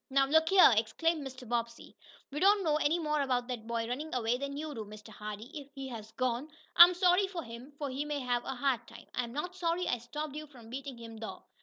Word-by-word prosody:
"Now 275 0 +4
look 320 +3 +4
here!" 375 -9 +8
exclaimed 305 +10 +1
Mr. 260 -2 -8
Bobbsey. 235 0 -3 0.4
"We 295 - -3
don't 400 +2 +5
know 305 -3 +2
any 310 +2 +2
more 300 -3 0
about 250 -3 0
that 230 -3 -5
boy 230 -1 -1
running 280 +5 -4
away 235 -1 +1
than 280 0 -4
you 305 0 -4
do, 225 - -5
Mr. 210 +1 -12
Hardee. 215 +3 -7
If 285 -3 -8
he 270 -1 -5
has 220 -3 -8
gone, 255 +3 -1 0.3
I'm 350 +1 +10
sorry 360 +2 +4
for 360 -3 -5
him, 235 +3 -10
for 290 - -3
he 270 +3 -2
may 295 -1 -2
have 245 -1 0
a 265 - -4
hard 250 -2 0
time. - - -12
I'm 235 -1 -2
not 325 +7 -4
sorry 345 0 0
I 245 - 0
stopped 295 +5 -6
you 305 0 -6
from 240 -5 -14
beating 270 0 -6
him, 230 -1 -9
though. 220 0 -7
270 Hz, 235 wpm, -32 LUFS, 235-310 Hz, 0.4 s, I'm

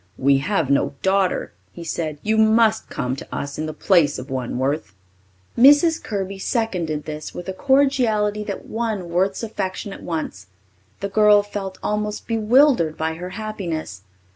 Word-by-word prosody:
"We 135 +1 +3
have 160 -3 0
no 140 - +1
daughter," 190 -1 +1 0.2
he 170 - -8
said. 155 -2 -3
"You 220 +1 +1
must 220 0 +3
come 125 +1 -2
to - - -9
us 140 +1 -5
in 155 - -2
the - - -3
place 170 -2 +2
of 130 +2 -8
one, 130 -2 -3
Worth." 135 -4 -2 0.6
Mrs. 290 +6 +6
Kirby 195 -2 -4
seconded 180 - -2
this 155 0 -7
with 175 - -7
a 190 - -3
cordiality 235 -5 +2
that 200 - -5
won 220 -6 -3
Worth's 190 +4 0
affection 200 -2 -4
at - - -10
once. 155 - -5 0.5
The 200 - -2
girl 210 0 +5
felt 200 -2 -6
almost 210 0 -2
bewildered 225 - +3
by 160 0 -1
her 175 +3 -7
happiness. 175 - -5
195 Hz, 160 wpm, -22 LUFS, 155-220 Hz, 0.6 s, Mrs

